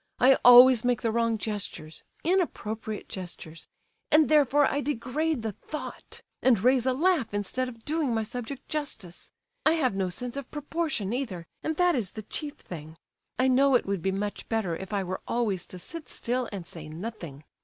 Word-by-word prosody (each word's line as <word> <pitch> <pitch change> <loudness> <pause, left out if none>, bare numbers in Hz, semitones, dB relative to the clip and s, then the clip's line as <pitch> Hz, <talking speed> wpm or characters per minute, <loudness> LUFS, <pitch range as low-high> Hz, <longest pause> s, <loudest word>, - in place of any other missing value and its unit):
I 265 +1 +6
always 245 -1 +9
make 245 -1 +1
the 225 - +1
wrong 230 0 +1
gestures—inappropriate 215 - -3
gestures—and 180 - -2
therefore 290 -1 +5
I 285 +1 0
degrade 290 +1 -1
the 220 - -1
Thought, 300 +9 -8 0.2
and 245 -5 +4
raise 255 0 +4
a 260 - +3
laugh 300 - +1
instead 250 +6 -1
of 230 -2 -14
doing 305 -3 0
my 225 -1 0
subject 245 +4 -6
justice. 225 - -5 0.3
I 315 - +5
have 275 -9 +1
no 190 -1 -1
sense 245 +8 -5
of 280 -2 -6
proportion 295 - -2
either, 220 -10 -3 0.2
and 315 - -2
that 355 -1 +4
is 230 - -2
the 215 - -7
chief 290 +7 -5
thing. 160 -2 -10 0.4
I 255 - +3
know 265 +1 +4
it 245 - +3
would 195 -3 -2
be 190 - 0
much 205 +2 -4
better 220 -7 0
if 190 +4 -8
I 200 -2 0
were 185 0 -4
always 210 -7 -1
to 185 - -10
sit 310 - -9
still 245 0 -2
and 195 -4 -6
say 155 -2 -10
nothing. 170 -4 -7
235 Hz, 175 wpm, -28 LUFS, 195-280 Hz, 0.4 s, always